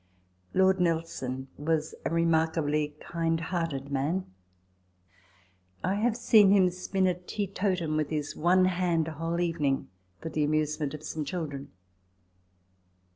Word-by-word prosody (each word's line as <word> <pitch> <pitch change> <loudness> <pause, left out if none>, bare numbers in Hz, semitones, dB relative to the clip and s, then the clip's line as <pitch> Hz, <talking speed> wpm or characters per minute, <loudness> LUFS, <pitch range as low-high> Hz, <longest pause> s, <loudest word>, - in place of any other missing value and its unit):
Lord 190 0 +4
Nelson 160 -7 -1
was 155 +1 0
a - - +1
remarkably 160 -2 +1
kind 165 -1 -1
hearted 165 -5 -3
man. 150 +7 0 1.6
I 185 - +1
have 220 +3 +1
seen 220 -4 +6
him 190 -2 +5
spin 185 +1 -1
a 180 - +3
teetotum 180 -3 -2
with 155 -2 0
his 150 -2 -3
one 185 +3 +4
hand, 175 -3 +1
a - - -3
whole 165 +2 -2
evening, 165 -6 0 0.3
for 160 - -5
the 155 -1 0
amusement 150 0 0
of 150 - -10
some 155 0 -3
children. 145 -3 -5
165 Hz, 130 wpm, -28 LUFS, 150-180 Hz, 1.6 s, seen